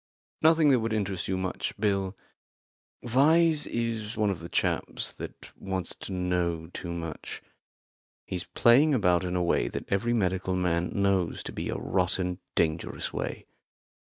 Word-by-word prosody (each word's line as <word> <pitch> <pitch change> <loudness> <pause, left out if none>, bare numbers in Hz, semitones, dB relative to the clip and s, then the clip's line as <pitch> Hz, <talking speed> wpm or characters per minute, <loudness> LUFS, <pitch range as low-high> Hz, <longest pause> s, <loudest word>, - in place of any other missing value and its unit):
"Nothing 160 -1 +5
that 130 -3 +5
would 115 0 -1
interest 100 -4 -1
you 95 - 0
much, 95 0 -3
Bill. 100 -2 0 0.9
Vyse 155 +5 +4
is 115 -2 -3
one 105 -2 +2
of 90 - -4
the 85 +1 -8
chaps - - -1
that - - -9
want 95 -2 -3
to - - -7
know 90 -3 -1
too 85 - -5
much. 85 -2 -6 0.8
He's 90 -2 -4
playing 135 +5 +5
about 90 -6 +3
in 90 0 -2
a 90 - +1
way 85 - +2
that - - -5
every 115 +5 +1
medical 95 -3 0
man 90 -1 0
knows 100 -3 +1
to - - -6
be - - -4
a - - -2
rotten, 90 -1 -1 0.2
dangerous 80 0 -1
way. - - -4
95 Hz, 155 wpm, -28 LUFS, 90-115 Hz, 0.9 s, Nothing